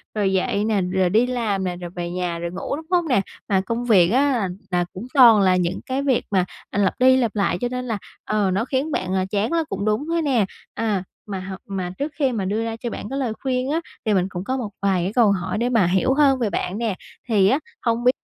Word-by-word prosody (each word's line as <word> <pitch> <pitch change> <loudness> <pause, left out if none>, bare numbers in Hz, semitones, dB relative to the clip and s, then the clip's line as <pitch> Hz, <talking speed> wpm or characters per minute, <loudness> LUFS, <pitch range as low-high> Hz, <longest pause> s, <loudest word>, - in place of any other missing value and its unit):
rồi 195 -2 +1
dậy 195 +2 +1
nè, 210 -3 +1
rồi 180 0 +1
đi 225 +6 +3
làm 225 -6 -1
nè, 180 -1 -2
rồi 175 -1 -7
về 175 -1 -5
nhà 175 -1 -2
rồi 170 0 -4
ngủ, 185 - -3
đúng 320 +2 -8
hông 350 -2 +2
nè? 245 -8 +3 0.3
Mà 190 -2 +3
công 230 +5 -3
việc 185 -7 +5
á 275 +5 +3
là 220 -7 0 0.2
là 175 0 +1
cũng 215 +7 -7
toàn 235 -7 +8
là 185 -1 +4
những 180 0 0
cái 265 +2 -2
việc 265 -4 +1
mà, 185 -2 +3 0.2
à, 205 - -2
lặp 200 +5 +1
đi 260 +1 +6
lặp 235 -4 0
lại 195 -4 +1
cho 245 - +1
nên 250 0 -3
là, 225 -4 -2 0.3
ờ, 210 -3 +1
nó 200 +5 0
khiến 275 +4 -1
bạn, 185 -8 -2
ờ, 190 -1 +1
chán 205 +7 0
nó 335 -1 +2
cũng 200 +1 -3
đúng 215 +7 0
thôi 335 0 0
nè. 255 -9 +2 0.3
À, 210 -5 -1 0.2
mà 195 -2 -4
h 190 +1 -6
mà 190 -3 -4
trước 290 +2 -2
khi 275 -4 +1
mà 205 -5 -2
đưa 210 +4 -1
ra 225 0 -3
cho 235 +1 -4
bạn 210 - -6
cái 275 - -3
lời 245 -5 -1
khuyên 255 0 -1
á, 325 - +1 0.3
thì 215 - +2
mình 185 -2 +2
cũng 180 -1 -5
có 260 +5 -2
một 230 -5 -3
vài 190 -3 +1
cái 195 - -2
câu 225 -4 +5
hỏi 185 +1 -2
để 240 +2 0
mà 230 -6 +3
hiểu 190 +9 +2
hơn 275 -2 +4
về 230 -4 +1
bạn 185 0 -2
nè. 225 -4 -1 0.3
Thì 200 -4 +4
á, 270 +6 +3 0.2
hông 230 0 0
biết 250 - +6
215 Hz, 270 wpm, -22 LUFS, 190-250 Hz, 0.3 s, toàn